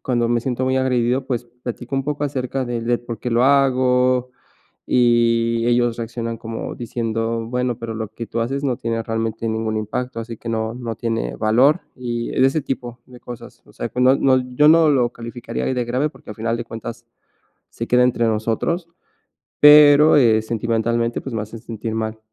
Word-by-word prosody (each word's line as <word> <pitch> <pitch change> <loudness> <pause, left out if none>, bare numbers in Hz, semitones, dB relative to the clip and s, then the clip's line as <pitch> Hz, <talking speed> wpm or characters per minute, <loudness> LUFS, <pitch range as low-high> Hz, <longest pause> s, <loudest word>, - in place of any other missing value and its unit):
cuando 120 -2 0
me 120 0 +1
siento 125 +1 -2
muy 130 0 +1
agredido, 130 0 +1
pues 120 -2 -2
platico 120 +1 -7
un 135 - 0
poco 145 +1 -2
acerca 135 -1 -2
de 120 -1 -3
de 120 +1 0
por 120 -2 -8
qué 125 - -3
lo 120 +2 +3
hago, 130 -2 +3 0.5
y 115 -1 +2
ellos 120 -1 +2
reaccionan 115 0 -5
como 115 0 -6
diciendo: 115 -1 -3
"Bueno, 125 0 -2
pero 115 -1 -5
lo 110 -1 -4
que 115 +2 -8
tú 115 +2 -3
haces 135 +5 -2
no 130 -3 0
tiene 115 0 -2
realmente 115 0 -3
ningún 110 0 -2
impacto, 115 +3 -4
así 115 0 -6
que 115 - -9
no 110 0 -2
no 115 -3 -5
tiene 110 - -3
valor", 130 +10 +3
y 120 -2 -4
de 130 - +3
ese 145 +2 -2
tipo 125 -3 -5
de 125 -1 -15
cosas. 120 -1 -11
O - - -20
sea, - - -5
que 125 - -3
no 130 +2 +5
no, 130 -1 +3 0.2
yo 150 - +5
no 160 +1 +6
lo 125 -4 +3
calificaría 120 +1 -6
ahí - - 0
de 125 - -1
grave 130 +6 -1
porque - - -14
al 105 - -8
final 115 +1 -1
de 120 - -5
cuentas 115 +1 -8 0.6
se 115 - -5
queda 125 0 +4
entre 120 -2 +1
nosotros. 115 - -1 0.7
Pero, 150 +1 +8
eh, 115 -6 +5
sentimentalmente, 115 +1 -1
pues 130 - -7
me 110 - -1
hacen 110 +1 -9
sentir 110 -1 -5
mal. 110 0 -3
120 Hz, 195 wpm, -20 LUFS, 115-130 Hz, 0.7 s, Pero